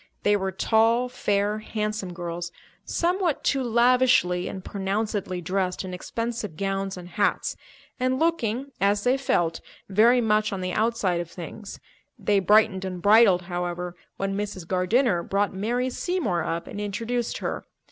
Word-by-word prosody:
They 205 0 +4
were 190 -1 -1
tall, 225 +5 +2
fair, 205 -3 0
handsome 215 -3 -3
girls, 175 0 -5 0.3
somewhat 350 -2 0
too 275 - +1
lavishly 240 -7 +3
and 190 -1 -7
pronouncedly 200 -1 -2
dressed 185 +1 -1
in 185 - -6
expensive 225 -2 -4
gowns 195 0 -2
and 175 -1 -9
hats, 205 +3 0 0.4
and 255 +1 +1
looking, 275 -5 0
as 200 +1 +2
they 250 +1 +3
felt, 175 -11 0 0.3
very 225 +6 +5
much 215 -2 +2
on 195 -2 -3
the 185 0 -2
outside 215 -5 +1
of 170 - -7
things. 195 +4 -8 0.4
They 205 -1 +2
brightened 205 0 +4
and 185 -1 -4
bridled, 205 -2 +5
however, 175 0 -4 0.2
when 195 0 -2
Mrs. 200 -4 -4
Gardiner 185 +2 +2
brought 200 +3 0
Mary 240 +6 -1
Seymour 245 - -1
up 170 +1 -2
and 205 - -6
introduced 230 +4 -2
her. - - -4
205 Hz, 145 wpm, -25 LUFS, 185-230 Hz, 0.4 s, very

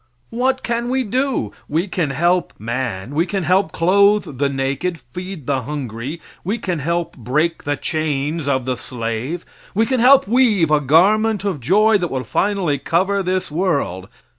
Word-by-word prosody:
What 260 +3 0
can 235 0 -1
we 260 +1 +1
do? 255 - -1 0.2
We 160 +5 +1
can 175 -5 -1
help 175 +6 +1
man; 120 0 -4
we 165 +5 +1
can 195 -2 -2
help 180 0 +2
clothe 200 -4 +3
the 140 -1 +2
naked, 140 +6 -2
feed 165 +6 -8
the 135 -1 0
hungry; 135 +1 -5 0.2
we 205 +6 -1
can 180 -7 -3
help 170 +3 -2
break 150 +8 -1
the 145 0 -1
chains 155 -1 -2
of 130 -3 0
the 130 -1 -1
slave; 120 +8 -4 0.3
we 220 +3 +3
can 260 +1 0
help 260 -1 +6
weave 215 -9 +3
a 150 -1 +4
garment 200 +9 +3
of 195 -7 -2
joy 205 - +4
that 175 -2 -2
will 130 -1 -3
finally 180 - 0
cover 190 +7 +1
this 185 -2 -2
world. 145 - -1
170 Hz, 165 wpm, -19 LUFS, 135-200 Hz, 0.3 s, help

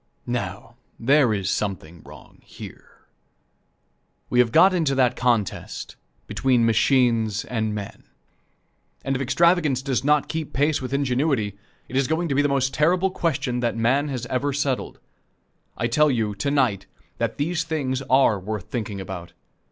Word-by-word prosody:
Now, 115 0 -5 0.2
there 135 0 +4
is 100 -3 -1
something 85 -5 -4
wrong - - -15 0.2
there. - - -12 1.3
We 125 - +2
have 120 -2 +4
got 190 +8 +6
into 160 -6 +1
that 125 -2 +2
contest 120 -6 -1 0.3
between 125 -3 +1
machines 115 -2 +2
and 110 -3 -2
men, 100 -1 -7 1.0
and 135 - 0
if 130 - -2
extravagance 150 -1 +2
does 135 -2 -1
not 150 0 +2
keep 160 -2 -4
pace 145 +1 +1
with 130 - -5
ingenuity, 135 -6 0 0.3
it 130 - -8
is 135 -1 +2
going 165 +2 -1
to - - 0
be 140 - +3
the 145 - +1
most 135 -1 0
terrible 180 +5 +2
question 145 -8 -1
that 120 -1 -1
man 130 +6 +2
has 130 -4 -4
ever 130 +3 -1
settled. 140 -2 -2 0.8
I - - -1
tell 150 +6 +3
you, 110 -5 0
to 100 +8 -2
night, 120 -9 +1 0.3
that - - -2
these 165 +3 -1
things 140 -5 -2
are 130 -6 +4
worth 105 +1 -6
thinking 105 -5 -4
about. 95 -3 -7
130 Hz, 155 wpm, -23 LUFS, 110-145 Hz, 1.3 s, got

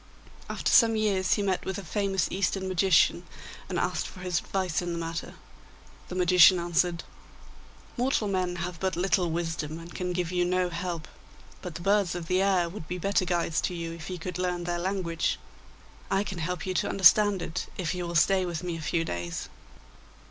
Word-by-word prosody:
After - - -1
some 225 -2 +6
years 200 -4 +2
he 205 - -1
met 190 -2 0
with 190 - -3
a 200 - -6
famous 195 +1 0
Eastern 190 0 -1
magician, 185 -2 +3 0.5
and - - -2
asked - - -1
for 185 - -11
his 180 -1 0
advice 185 -4 -1
in 175 -1 -3
the - - -3
matter. 165 0 -5 0.7
The 180 - -7
magician 180 0 +6
answered: 170 0 0 0.9
'Mortal 245 -3 +1
men 185 -2 -1
have 175 0 -5
but 190 +1 -1
little 180 0 +1
wisdom, 160 -2 -3
and 165 +1 -10
can 180 -1 -3
give 175 -1 -2
you 180 -1 +1
no 180 0 +1
help, 170 -1 -4 0.5
but 180 -3 -7
the - - -6
birds 195 -1 +2
of 175 -2 -4
the 185 +2 +1
air 190 -3 +2
would 170 -2 -8
be 180 - -4
better 195 +1 +1
guides 170 -3 0
to 180 - -2
you 165 -1 -4
if 165 +1 -8
you 180 - -4
could 180 +1 -5
learn 180 -1 -1
their 175 0 -2
language. 180 -2 -1 0.7
I 195 +1 +2
can 190 -4 -6
help 170 0 -3
you 185 - -2
to - - 0
understand 195 0 +5
it 165 - -4
if 180 -3 -1
you 180 -1 -3
will 170 - -5
stay 185 +4 +4
with 175 -2 -4
me 175 -2 -3
a - - -7
few 165 +2 0
days. 85 - -4
180 Hz, 200 wpm, -28 LUFS, 170-190 Hz, 0.9 s, some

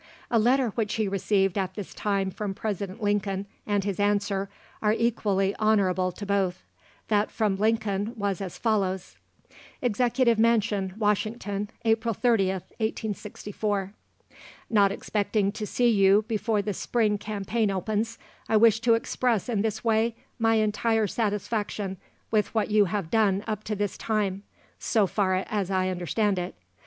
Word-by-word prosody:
A 230 - +4
letter 250 +2 +3
which 215 0 -2
he 220 -2 0
received 195 0 +1
at 185 -1 -3
this 205 -4 -7
time 195 -2 -1
from 200 0 -4
President 205 0 -4
Lincoln, 200 -1 0 0.2
and 205 -1 +1
his 200 -1 -3
answer, 200 -1 +1 0.3
are 210 0 +3
equally 205 -4 +1
honourable 190 -4 +2
to 205 - -7
both. 195 -3 0 0.5
That 210 -1 +2
from 210 -4 0
Lincoln 215 0 0
was 200 -2 -1
as 185 -3 -5
follows: 195 -5 -1 0.6
"EXECUTIVE 245 0 +2
MANSION, 210 -4 +2
WASHINGTON, 210 -1 -1 0.2
"April 225 0 +2
30th, 195 -7 +1 0.2
1864. 205 -2 -3 0.8
"Not 200 -3 +5
expecting 205 0 0
to 210 0 -5
see 245 +3 +2
you 200 -1 +4
before 220 -2 0
the 210 - -2
spring 210 +1 0
campaign 210 +1 -1
opens, 215 +4 -1 0.3
I 220 - +4
wish 225 0 +5
to 230 0 +4
express 230 -2 0
in 225 -5 0
this 220 -1 -2
way 225 0 +2 0.2
my 225 0 +3
entire 220 +1 +2
satisfaction 205 -2 -2 0.3
with 215 0 +1
what 215 -1 +1
you 210 -1 +5
have 185 -3 -3
done 205 -3 +2
up 215 -1 -3
to 210 - -2
this 205 -1 -2
time, 205 -3 -1 0.4
so 220 -4 +2
far 190 -1 +1
as 200 -3 -1
I 185 -1 +1
understand 185 +2 0
it. 180 - -5
210 Hz, 145 wpm, -26 LUFS, 195-220 Hz, 0.8 s, Not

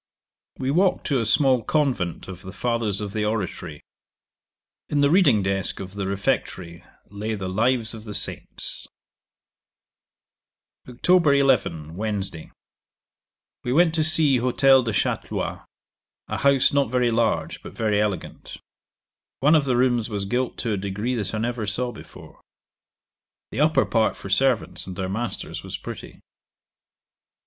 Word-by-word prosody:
'We 130 +1 -1
walked 180 +5 +2
to 140 -3 +1
a 115 - -1
small 130 0 +3
convent 125 - -1
of 95 -2 -8
the 95 - -9
Fathers 110 -1 -1
of 100 -1 -5
the 110 - -1
Oratory. 100 -8 -3 1.1
In 145 -1 +1
the 145 0 +4
reading 145 - +5
desk 95 -1 -1
of 95 0 -7
the 100 -1 -3
refectory 95 -5 -2 0.3
lay 105 +2 -3
the 95 -2 -4
lives 115 +4 +1
of 110 -1 -9
the 105 -2 -5
Saints. - - -5 2.0
'Oct. 150 +4 +3
11. 100 - +1
Wednesday. 100 -5 -4 1.1
We 120 - -2
went 165 +4 +4
to 160 -1 +2
see 155 -4 +3
Hotel 130 +2 +4
de 115 -2 -2
Chatlois, 95 -3 -2 0.6
a - - -3
house 140 -1 +4
not 140 -4 +2
very 125 -1 +2
large, 115 -1 0
but - - -10
very 105 -2 +1
elegant. 105 -3 -4 0.8
One 150 +4 +4
of 155 -3 +4
the 125 -3 +1
rooms 120 -2 +2
was 100 -2 -3
gilt 125 +5 -1
to 115 - -2
a - - -1
degree 100 +5 -2
that 110 -3 -3
I - - -1
never 115 -1 -2
saw 120 +4 -1
before. 110 - -13 1.1
The - - -4
upper 155 +2 +4
part 110 -2 +1
for 100 - -8
servants 125 -1 +1
and 95 - -6
their 95 0 -3
masters 115 +5 -4
was - - -6
pretty. - - -9
115 Hz, 145 wpm, -24 LUFS, 100-130 Hz, 2.0 s, reading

